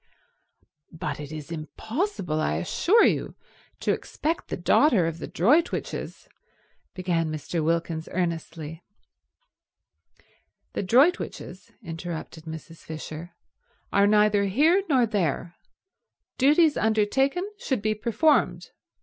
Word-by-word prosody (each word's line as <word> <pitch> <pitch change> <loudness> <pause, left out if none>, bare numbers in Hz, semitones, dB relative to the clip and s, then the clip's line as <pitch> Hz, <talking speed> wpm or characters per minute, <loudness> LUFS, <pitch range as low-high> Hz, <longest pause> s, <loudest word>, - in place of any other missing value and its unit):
"But 155 -3 -5
it 145 0 -7
is 155 0 -8
impossible, 180 - -3
I 75 - 0
assure 345 - +3
you, - - 0 0.5
to - - +1
expect 320 +3 -3
the - - -4
daughter 195 - +4
of 165 0 -3
the - - -5
Droitwiches—" 290 - 0 0.7
began 170 -3 -1
Mr. 155 +2 -3
Wilkins 165 0 -1
earnestly. 165 -2 -3 1.9
"The - - -2
Droitwiches," 260 - +1
interrupted 165 -2 -7
Mrs. 160 +1 -8
Fisher, 160 +2 -8 0.6
"are 200 0 +5
neither 210 -1 +4
here 305 - +4
nor 255 -5 +4
there. 175 - -1 0.9
Duties 300 +3 +5
undertaken 260 - +1
should 260 - -2
be 215 0 +2
performed. 235 +8 +1
185 Hz, 105 wpm, -26 LUFS, 160-260 Hz, 1.9 s, are